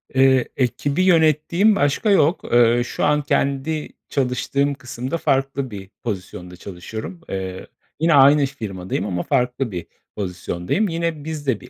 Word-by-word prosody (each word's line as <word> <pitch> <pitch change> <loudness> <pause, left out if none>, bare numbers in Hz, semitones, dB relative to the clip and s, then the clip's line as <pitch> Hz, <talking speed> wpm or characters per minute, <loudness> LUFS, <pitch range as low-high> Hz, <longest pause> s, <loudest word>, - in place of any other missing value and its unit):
Eee, 130 -1 +4
ekibi 140 +6 0
yönettiğim 170 +4 +4
başka 145 +7 +1
yok. 170 -3 +3
Eee, 120 0 +5
şu - - -4
an 150 0 +3
kendi 140 +2 -1 0.2
çalıştığım 140 +2 0
kısımda 130 +2 -5
farklı 135 -3 0
bir 95 -2 -8
pozisyonda 90 -4 -6
çalışıyorum. 100 - -8
Eee, 95 -1 -5 0.3
yine 165 +1 +3
aynı 140 +1 +6
firmadayım 100 -9 -4
ama 90 -4 -2
farklı 125 -2 0
bir 90 -2 -6 0.3
pozisyondayım. 90 - -2
Yine 165 -2 -2
biz 155 -2 -6
de 120 -6 +1
bir - - -13
135 Hz, 140 wpm, -21 LUFS, 105-150 Hz, 0.3 s, aynı